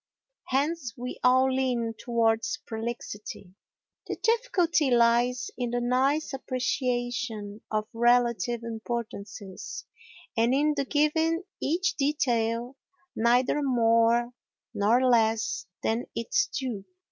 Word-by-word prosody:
Hence 275 -3 -1
we 250 +1 -6
all 260 +1 +4
lean 245 -3 0
towards 230 0 0
prolixity. 220 -4 -6 0.5
The - - -2
difficulty 370 - +2
lies 240 -1 +3
in 245 -1 -1
the 245 +1 -1
nice 265 +5 +1
appreciation 245 -5 -2
of 215 0 -1
relative 235 -1 +2
importances 220 -4 -6 0.5
and 235 +3 +3
in 300 +2 +2
the 280 -1 -1
giving 320 +4 +1 0.2
each 350 +7 0
detail 245 -4 0 0.4
neither 245 +5 +2
more 235 -2 +3 0.4
nor 235 +6 +3
less 230 - +2 0.2
than 225 +2 0
its 410 - +1
due. 245 - -4
245 Hz, 100 wpm, -27 LUFS, 230-270 Hz, 0.5 s, all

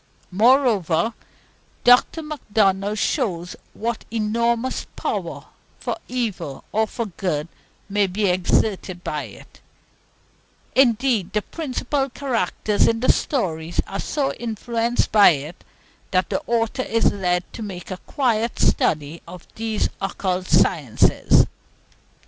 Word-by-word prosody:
Moreover, 220 - +3 0.7
Dr. 245 +6 +5
Macdonald 210 -8 0
shows 180 - -1 0.2
what 230 +1 -3
enormous 230 +3 0
power, - - -3 0.3
for - - -2
evil 225 - -3
or 220 +1 +1
for 230 +2 -4
good, 175 -5 -2 0.4
may 205 -1 +2
be 200 +3 -1
exerted 185 0 0
by 150 -3 -3
it; 105 - -15 1.1
indeed, 240 -5 +3
the 210 -1 0
principal 275 -2 -2
characters 230 -6 0
in 225 - +1
the 255 - +5
story 170 - -2
are 195 - -5
so 280 -2 -1
influenced 235 +1 -1
by 210 -2 +8
it, 150 +5 -9 0.5
that 185 -2 +1
the - - 0
author 230 +1 0
is 230 -2 +2
led 180 -2 0
to - - -7
make 190 -3 -7 0.2
quite 235 -4 0
a - - -8
study 150 +1 +1
of 175 0 -10
these 220 -1 -1
occult 185 -1 -2
sciences." 145 -11 +3
215 Hz, 115 wpm, -22 LUFS, 180-235 Hz, 1.1 s, by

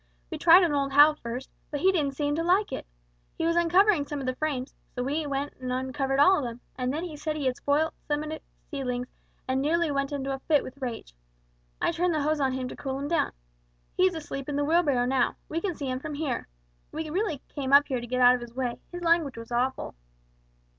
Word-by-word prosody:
We - - -4
tried 345 +3 +8
on 335 -4 +2
old 275 -1 0
Hal 295 +2 +8
first, 250 -2 -7 0.2
but 290 -2 -3
he 380 - +5
didn't 290 -7 0
seem 290 0 0
to 320 - 0
like 370 +5 +2
it. - - -5 0.5
He - - -1
was 335 0 +2
uncovering 345 -1 +4
some 295 - -4
of 270 - -4
the 255 - 0
frames, 275 -3 -2 0.2
and 245 - 0
so - - -4
we 295 +3 -1
went 280 +1 -2
and 255 -1 -4
uncovered 265 +1 -1
all 375 +6 +6
of - - -3
them, 240 -1 -5 0.2
and 255 0 -1
then 310 +4 -3
he 340 -4 -6
said 305 +1 -3
we 290 - -3
had 255 -1 +1
spoilt 295 +4 +1
some 295 0 0
of 305 - -5
his 315 - -6 0.3
seedlings, 250 -3 -3 0.4
and 260 +1 +1
nearly 325 +2 +1
went 275 0 -1
into 275 -1 -2
a 270 - -4
fit 295 +1 +2
with 270 +2 -10
rage. 235 - -5 0.7
I - - +1
turned 345 0 0
the 300 - 0
hose 305 +1 +1
on 265 -2 +1
him 260 -1 -3
to - - -7
cool 265 -1 -4
him 280 +1 -4
down. 335 - +1 0.6
He 370 - +5
is 365 - -2
asleep 290 -3 -5
in 290 - -2
the 290 0 +1
wheelbarrow 295 -6 +3
now; 255 -1 +1
we 330 +2 -3
can 365 -3 -2
see 285 - -5
him 255 0 -2
from 295 +2 -6
here. 285 -4 -2 0.4
We 310 0 -4
really 340 -6 -1
came 275 -3 -4
up 285 +1 +7
here 255 -3 -2
to 240 - -7
get 255 +1 -1
out 245 0 +8
of 250 - -1
his 240 0 -10
way, 250 -2 -2
his 350 0 -6
language 330 -6 +2
was 230 +1 -9
awful!" 250 +2 -1
285 Hz, 250 wpm, -27 LUFS, 260-320 Hz, 0.7 s, tried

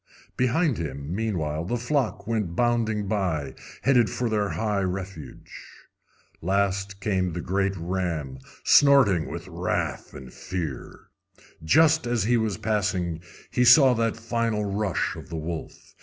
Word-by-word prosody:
Behind 130 - +1
him, 70 0 -5
meanwhile, 85 -8 -2
the 120 +8 -2
flock 125 -3 -1
went 105 -6 -2
bounding 110 -2 +1
by, 85 -10 -1 0.3
headed 120 -5 +4
for 120 +5 -2
their 105 -2 0
high 105 -2 -1
refuge. 95 -7 -6 0.9
Last 100 +2 -1
came 95 -3 0
the 85 - -4
great 95 +3 -1
ram, 85 -6 -3 0.2
snorting 135 - +5
with - - -7
wrath - - -3
and 65 -1 -10
fear. 85 -8 -6 0.6
Just 160 - +4
as 120 -4 0
he 120 +4 +2
was 110 -3 0
passing 95 -6 -1 0.3
he 125 - +2
saw 125 +2 +7
that 115 -1 0
final 115 -2 -1
rush 100 -2 -1
of - - -10
the 85 - -5
wolf. 80 +1 -7
100 Hz, 135 wpm, -25 LUFS, 85-115 Hz, 0.9 s, saw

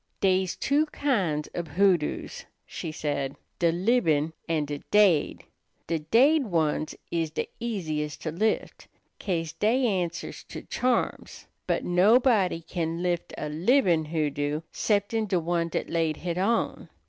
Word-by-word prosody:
"Dey's 185 -1 +2
two 295 +3 +1
kinds 190 - 0
ob 170 -1 -3
hoodoos," 180 -4 0 0.2
she 160 - -6
said, 140 -3 -2 0.2
"de 170 -1 +3
libin' 165 -5 +2 0.2
an' 155 -3 +1
de 145 0 -5
daid. 200 -8 +3 0.4
De 165 0 -1
daid 265 - +4
ones 155 -4 0 0.2
is 165 -2 0
de 155 - -3
easiest 155 -10 -3
to 160 - -2
lift, 215 +7 -1 0.3
'ca'se 165 -4 -2
dey 245 +5 +2
answers 180 -6 -2
to - - -8
charms; 250 -1 -1 0.2
but - - 0
nobody 195 -1 +4
can 165 0 -3
lift 175 -1 -1
a 150 - -3
libin' 170 - +2
hoodoo 150 -1 -1
'ceptin' 215 +1 0
de 185 -3 +1
one 170 0 0
dat - - -2
laid 165 -2 0
hit 175 0 -3
on. 225 +5 0
175 Hz, 135 wpm, -27 LUFS, 155-210 Hz, 0.4 s, daid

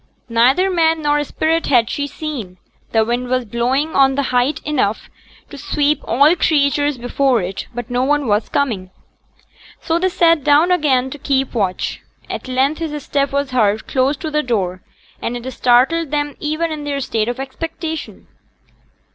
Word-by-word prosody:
Neither 260 +12 +3
man 325 -2 +2
nor 295 0 +2
spirit 320 +3 -1
had 240 -5 +4
she 285 +3 -2
seen; 265 - -6 0.3
the 220 -1 +3
wind 240 +2 -2
was 255 -1 0
blowing 255 +7 -1
on 270 -1 +4
the 280 - 0
height 250 +4 +2
enough 260 -8 -1 0.4
to 285 - -9
sweep 295 +1 +1
all 285 +8 +4
creatures 290 -3 +1
before 245 -2 +1
it; 185 +2 -5
but 240 0 -6
no 245 +1 +1
one 290 +1 +1
was 210 -1 0
coming. 220 -10 -1 0.9
So 330 0 0
they 375 +1 +1
sate 330 -4 +3
down 295 +5 +4
again 265 -7 +2
to 290 - -8
keep 270 -2 0
watch. 195 -6 -2 0.3
At - - -5
length 265 +4 +1
his 300 -3 -4
step 280 0 0
was 280 -1 -1
heard 220 -4 +1
close 270 +2 +1
to 315 +1 -5
the 300 0 +1
door; 190 -9 -2 0.4
and 245 - -2
it 240 +1 -8
startled 260 +7 +2
them 290 -1 -2
even 310 +2 -2
in 305 -1 -5
their 285 -1 -2
state 225 -5 -1
of 245 - -4
expectation. 320 +4 -6
275 Hz, 170 wpm, -18 LUFS, 245-300 Hz, 0.9 s, had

